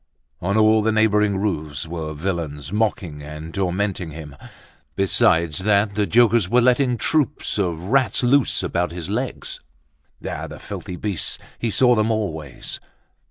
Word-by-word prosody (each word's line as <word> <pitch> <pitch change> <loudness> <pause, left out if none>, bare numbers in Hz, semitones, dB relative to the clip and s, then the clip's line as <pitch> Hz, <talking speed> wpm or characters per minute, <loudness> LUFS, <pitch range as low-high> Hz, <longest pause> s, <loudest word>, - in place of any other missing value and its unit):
On 100 +4 0
all 110 0 +5
the 110 +1 +1
neighboring 105 -2 +3
roofs 75 -9 -2
were 80 -1 -5
villains 80 -2 -4
mocking 105 -8 -1
and 75 +2 -8
tormenting 95 -1 -1
him. 75 -2 -9 0.6
Besides 85 -4 +2
that, 100 +1 +2
the 105 0 0
jokers 115 -4 +4
were 120 - +4
letting 125 0 +3
troops 150 -4 0
of 90 -5 0
rats 125 +9 +1
loose 135 +2 +3
about 90 0 -1
his 85 +1 -5
legs. 125 +4 -3 0.7
Ah! - - -4
the - - -9
filthy 90 - -7
beasts, 100 -1 0 0.2
he 115 - -1
saw 125 +3 +4
them 110 -1 +2
always! 80 - -3
100 Hz, 145 wpm, -22 LUFS, 80-110 Hz, 0.7 s, all